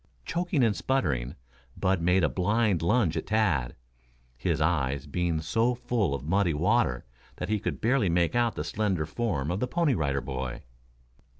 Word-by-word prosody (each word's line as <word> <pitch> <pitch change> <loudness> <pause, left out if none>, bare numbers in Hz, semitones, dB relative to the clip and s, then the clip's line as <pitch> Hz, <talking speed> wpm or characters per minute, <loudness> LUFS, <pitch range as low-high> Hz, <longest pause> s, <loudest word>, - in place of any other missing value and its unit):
Choking 170 -5 0
and 110 -3 +2
sputtering, 70 - -1 0.4
Bud 95 -2 +1
made 90 +2 +3
a - - +5
blind 100 0 +1
lunge 90 -1 +2
at - - -3
Tad, 95 - +1 0.6
his - - -1
eyes 70 -4 0
being 85 +2 -1
so 115 +10 +1
full 110 - 0
of 70 - -6
muddy 90 -1 +1
water 90 - +1 0.3
that 90 - -5
he 110 -1 +1
could - - -3
barely 115 -4 +2
make 85 -1 +2
out 120 -1 +1
the - - -3
slender 95 -7 -1
form 80 - -2
of 95 - -2
the 125 - -1
Pony 165 0 +1
Rider 70 - 0
Boy. 65 -1 -5
90 Hz, 170 wpm, -28 LUFS, 75-115 Hz, 0.6 s, a